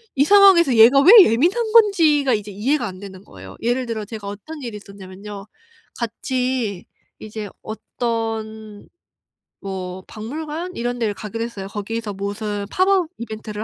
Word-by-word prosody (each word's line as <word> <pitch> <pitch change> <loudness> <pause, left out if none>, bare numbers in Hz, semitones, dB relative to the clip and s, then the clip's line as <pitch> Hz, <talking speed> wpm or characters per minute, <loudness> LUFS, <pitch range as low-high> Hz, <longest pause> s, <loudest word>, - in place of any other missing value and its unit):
이 280 +2 +3
상황에서 380 - +6
얘가 235 +5 +7
왜 365 - +7 0.2
예민한 390 - +1
건지가 325 - +4
이제 210 -1 -3
이해가 245 +6 -1
안 185 -1 -9
되는 195 -1 -11
거예요. 95 -1 -13
예를 245 +2 -1
들어 225 -2 -4
제가 215 -2 -8
어떤 280 +10 -8
일이 235 -4 -6
있었냐면요. 200 0 -11 0.5
같이 240 -3 -3 0.4
이제 215 -1 -7
어떤 220 -2 -5 0.7
뭐 185 -1 -6
박물관 310 +10 -6
이런 245 +1 -3
데를 210 -3 -1
가기로 225 +2 -5
했어요. 210 -5 -6
거기서 210 +1 -5
무슨 205 +1 -4
"팝업 370 -2 +2
이벤트를 215 -2 -7
225 Hz, 315 characters per minute, -20 LUFS, 205-270 Hz, 0.7 s, 얘가